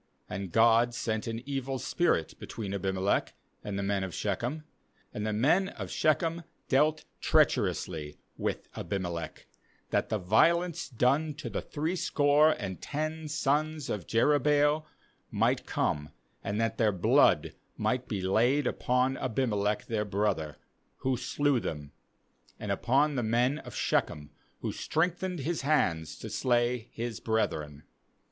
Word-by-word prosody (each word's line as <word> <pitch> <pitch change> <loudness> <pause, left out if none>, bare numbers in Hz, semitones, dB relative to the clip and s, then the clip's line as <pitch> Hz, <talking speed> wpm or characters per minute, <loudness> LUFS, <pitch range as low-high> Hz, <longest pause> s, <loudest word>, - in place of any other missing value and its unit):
^And 95 -1 -4
God 115 +2 +4
sent 110 -1 -2
an 115 +1 -4
evil 135 -1 -2
spirit 130 - 0
between 100 -3 -6
Abimelech 95 0 0 0.3
and 100 -1 -4
the 100 - -1
men 100 -1 0
of 95 -3 -5
Shechem; 120 +9 -2 0.5
and 105 +1 -3
the - - 0
men 150 - +3
of - - -7
Sbechem 165 +2 +1 0.3
dealt 150 +3 +3
treacherously 75 -2 +1 0.2
with - - -3
Abimelech; 90 -4 -4 0.5
^hat - - +1
the 110 - +1
violence 160 - +2
done 140 +5 +1
to 155 - -6
the - - -2
threescore 150 -2 +2
and 100 -11 -3
ten 155 +1 -3
sons 150 0 0
of 105 -5 -4
Jerubbaal 145 +4 +3 0.4
might - - +1
come, 75 0 -1 0.3
and 100 +2 -2
that 115 0 -1
their 110 -3 +4
blood 90 -3 +3 0.2
might 125 0 0
be 100 -4 -3
laid 120 +9 +3
upon 125 +2 +1
Abimelech 105 -5 0
their 110 -2 -1
brother, 100 -7 -1 0.4
who 130 -1 +1
slew 135 +2 +1
them, 75 -8 -5 0.7
and - - -3
upon 140 +5 +2
the 130 - 0
men 120 +6 +1
of - - -10
Shechem, 75 -1 -1 0.3
who - - -2
strengthened 175 +1 -1
his 165 +4 -2
hands 85 - +1
to - - -7
slay 120 -1 +1
his 115 -1 -4
brethren. 75 -10 -1
120 Hz, 135 wpm, -29 LUFS, 100-145 Hz, 0.7 s, God